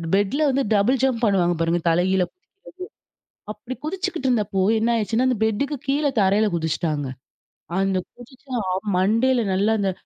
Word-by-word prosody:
பெட்ல 205 +9 0
வந்து 275 +1 +1
double 225 +6 +2
jump 255 -3 +1
பண்ணுவாங்க 180 -4 +2
பாருங்க 165 +1 +1
தலை 170 +2 +2
கீழ 190 0 +2
குதிக்கிறது. 365 +2 -53 1.0
அப்பிடி 235 +4 -8
குதிச்சுக்கிட்டு 360 -5 -2
இருந்தப்போ, 205 -5 0 0.2
என்னாயிருச்சுன்னா, 230 +1 +1
அந்த 250 -4 0
பெட்டுக்கு 250 +7 -1
கீழே 285 +1 +1
தரையில 200 +3 +3
குதிச்சிட்டாங்க. 160 -2 -2 0.7
அந்த 195 -1 +1 0.2
குதிச்சா 255 +2 -9 0.4
மண்டையில 230 +7 +2
நல்லா 200 +4 +2
அந்த 195 -1 +1
220 Hz, 135 wpm, -22 LUFS, 190-260 Hz, 1.0 s, தரையில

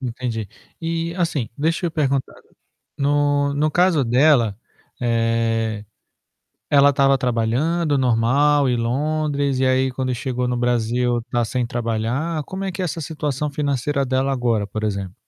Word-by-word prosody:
Entendi. 120 -4 -4 0.3
E 165 0 -2
assim, 160 - -1
deixa 165 +4 0
eu - - -2
perguntar, 140 -4 -1 0.6
no 145 0 +1
no 150 +1 +1
caso 175 -5 +3
dela, 120 -4 +3 0.4
eh, 115 -2 0 0.9
ela 140 0 +6
estava 135 0 +3
trabalhando 130 +6 0
normal 130 +4 +3
em 125 - +1
Londres, 140 +2 -1
e 130 - +2
aí, 130 0 +2
quando 130 0 -2
chegou 125 0 -2
no 125 - -1
Brasil, 120 0 0
está 120 +1 -2
sem 125 +2 -1
trabalhar, 120 +7 -2
como 190 +6 -6
é 195 - -2
que 180 - -5
é 180 - 0
essa 165 0 -4
situação 150 -1 -3
financeira 140 -1 -1
dela 130 +1 0
agora, 120 -5 0
por 110 +2 -5
exemplo? 100 -3 -3
130 Hz, 145 wpm, -21 LUFS, 120-150 Hz, 0.9 s, ela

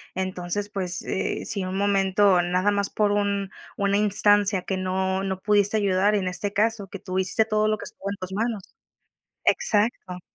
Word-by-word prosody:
Entonces, 185 +2 -3
pues, 185 -3 -2
eh, - - -2
si 200 -3 -2
un 185 +1 -4
momento 195 -1 +3
nada 180 +3 +1
más, 200 -1 0
por 210 -1 +1
un 200 -1 0 0.3
una 200 0 +1
instancia 205 -1 +3
que 190 +1 -3
no 190 +1 -1
no 190 -1 -3
pudiste 205 0 +2
ayudar 200 0 +2
en 195 -3 -1
este 185 +3 -3
caso, 215 -1 0
que 200 - -8
tú 185 -1 -3
hiciste 190 +4 +1
todo 215 -1 +1
lo 215 0 +1
que - - -9
estuvo 200 - -7
en 200 - -3
tus 185 0 -7
manos 220 -1 -2 0.8
Exacto. 205 - +1
200 Hz, 180 wpm, -24 LUFS, 185-205 Hz, 0.8 s, momento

